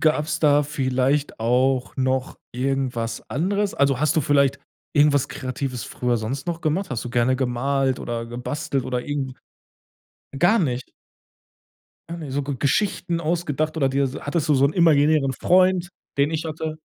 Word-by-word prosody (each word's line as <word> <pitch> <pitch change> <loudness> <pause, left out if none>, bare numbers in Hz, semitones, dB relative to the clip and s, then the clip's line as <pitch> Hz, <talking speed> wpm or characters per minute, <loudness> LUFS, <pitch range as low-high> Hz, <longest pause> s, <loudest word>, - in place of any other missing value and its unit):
gab's 155 0 +1
da 145 -1 +5
vielleicht 135 0 0
auch 125 +3 +1
noch 130 -1 -1
irgendwas 125 -3 -2
anderes? 200 +7 0
Also, 140 -2 +2
hast 155 +1 +2
du - - +5
vielleicht 140 -1 +2 0.4
irgendwas 145 -2 +4
Kreatives 130 -2 -4
früher 125 -1 -1
sonst 125 +7 -4
noch 170 -1 -2
gemacht? 170 +5 -1
Hast 120 -3 -3
du 120 - -5
gerne 125 +1 +2
gemalt 130 +1 0
oder 115 -1 -4
gebastelt 125 +2 -3
oder 125 -1 -2
irgend 145 -2 -2 1.1
'nen - - -5
Gar 190 +9 +4
nicht? 130 -7 -2 1.2
Gar 170 - -6
nich 150 -5 -7
So 145 +1 0
G 140 +1 -3
Geschichten 175 +2 0
ausgedacht 155 -2 -1
oder 135 -4 +2
dir 135 0 +1
hattest 155 +1 -2
du 150 - +4
so 135 0 +4
'nen 140 - -1
imaginären 150 -4 +4
Freund, 185 +4 +3 0.3
den 140 +1 +3
ich 160 0 -2
hatte? 155 0 -4
140 Hz, 160 wpm, -23 LUFS, 130-155 Hz, 1.2 s, da